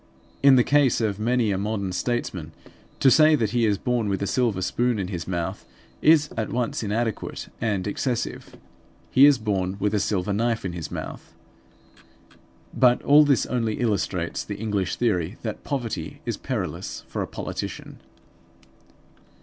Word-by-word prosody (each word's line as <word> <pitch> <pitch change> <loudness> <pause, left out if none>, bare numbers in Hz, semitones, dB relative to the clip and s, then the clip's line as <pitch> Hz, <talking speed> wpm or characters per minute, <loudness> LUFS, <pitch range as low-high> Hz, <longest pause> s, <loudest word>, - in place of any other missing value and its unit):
In 140 -1 +7
the 125 - +5
case 140 -2 +3
of 105 -3 -1
many 115 -1 +1
a 95 - -1
modern 100 -2 -2
statesman 90 -7 -3 0.5
to 135 - +5
say 155 +3 +6
that 110 -7 0
he 120 -1 +2
is 105 -1 +1
born 120 -1 -1
with 95 -1 -1
a - - 0
silver 105 -3 0
spoon 120 +4 0
in 95 -3 -3
his 85 -4 -5
mouth, 85 -2 -3 0.4
is 150 -2 +5
at 110 -1 -2
once 120 -1 -1
inadequate 110 +1 -3
and 105 -5 -1
excessive. 120 +3 -3 0.6
He 135 +2 +7
is 145 -2 +5
born 100 -4 -2
with 105 +1 0
a 105 - +2
silver 100 0 -1
knife 115 0 0
in 90 - -3
his 85 -3 -5
mouth. - - -7 1.4
But 125 -2 +3
all 150 +2 +7
this 140 -3 +2
only 115 -4 -1
illustrates 100 -7 -1
the 100 - -6
English 100 -4 -1
theory 95 -4 0
that 110 -2 -5
poverty 130 -6 -4
is - - -2
perilous - - -4
for - - -4
a - - -3
politician. - - -6
110 Hz, 160 wpm, -24 LUFS, 100-125 Hz, 1.4 s, In